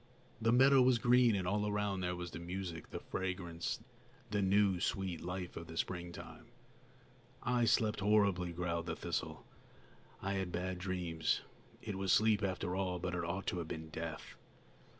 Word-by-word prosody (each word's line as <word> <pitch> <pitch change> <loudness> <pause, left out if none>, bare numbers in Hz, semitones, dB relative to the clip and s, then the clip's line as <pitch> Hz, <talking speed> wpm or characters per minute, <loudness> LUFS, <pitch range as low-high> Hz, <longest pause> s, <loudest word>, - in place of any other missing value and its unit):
The 115 +1 +3
meadow 135 +2 +7
was 125 -1 +5
green, 120 -1 +5
and 95 -2 -1
all 105 +2 +1
around 105 -2 0
there 90 0 -1
were 90 0 -4
the 85 - -7
music, 85 -1 -5
the - - -5
fragrance, 90 -3 -3 0.5
the 105 -1 +1
new, 95 -1 +3
sweet 95 -1 -1
life 90 0 -4
of 85 - -6
the 80 - -8
springtime. 85 -1 -5 1.0
"I 125 -1 +2
slept 110 -1 +3
horribly," 100 -4 +3
growled 85 -1 -2
the - - -2
thistle. - - -3 0.7
"I 100 +1 -2
had 95 -2 -2
bad 90 +1 -2
dreams. 90 -4 -1 0.4
It 100 - -4
was 95 -1 +1
sleep, 110 0 +5
after 90 -2 -1
all, 95 -2 0
but 90 +1 -3
it 90 - -1
ought 85 +4 -3
to 90 - -1
have 85 - -4
been 80 0 -6
death." 80 -2 -5
95 Hz, 170 wpm, -35 LUFS, 85-105 Hz, 1.0 s, meadow